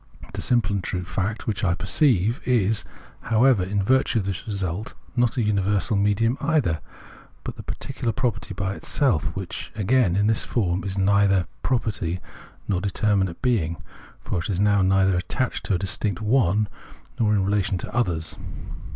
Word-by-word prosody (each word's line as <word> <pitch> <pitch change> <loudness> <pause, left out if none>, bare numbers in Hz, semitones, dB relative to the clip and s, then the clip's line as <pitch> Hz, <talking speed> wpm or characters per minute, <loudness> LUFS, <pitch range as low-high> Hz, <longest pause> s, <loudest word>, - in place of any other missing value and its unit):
The - - -3
simple 120 -4 +2
and 100 -2 -1
true 90 0 -3
fact, 95 +5 -3
which 110 -2 -2
I 85 -3 +2
perceive, 110 - +2
is, 110 -4 +2 0.5
however, 115 -1 +4
in 100 +2 -1
virtue 130 +2 +2
of 100 - 0
this 95 0 -4
result, 100 -1 -3 0.2
not 120 0 +1
a 120 - +2
universal 105 +1 +1
medium 105 +5 +2
either, 140 - +1 0.6
but - - -5
the - - -8
particular 115 - -3
property 115 -5 -2
by 95 0 -2
itself, 115 - +1
which, - - -6
again, 105 -2 +2
in 100 +1 +2
this 110 0 +2
form, 95 -5 0
is 95 -1 -3
neither 100 0 +4
a - - -9
pro 130 - +2
perty 95 -6 -3 0.5
nor 95 -4 +1
a - - -7
determinate 100 -2 0
being, 90 -10 +1 0.4
for 90 - -2
it 85 - -4
is 95 -3 -1
now 100 -1 +4
neither 95 0 +3
attached 125 +8 -2
to 100 - +2
a - - +2
distinct 95 +1 -1
"one" 110 -3 +2 0.5
nor 110 -2 +3
in 95 -2 +2
relation 100 -1 +1
to 90 - -6
others. 85 -10 -1
100 Hz, 175 wpm, -24 LUFS, 95-115 Hz, 0.6 s, however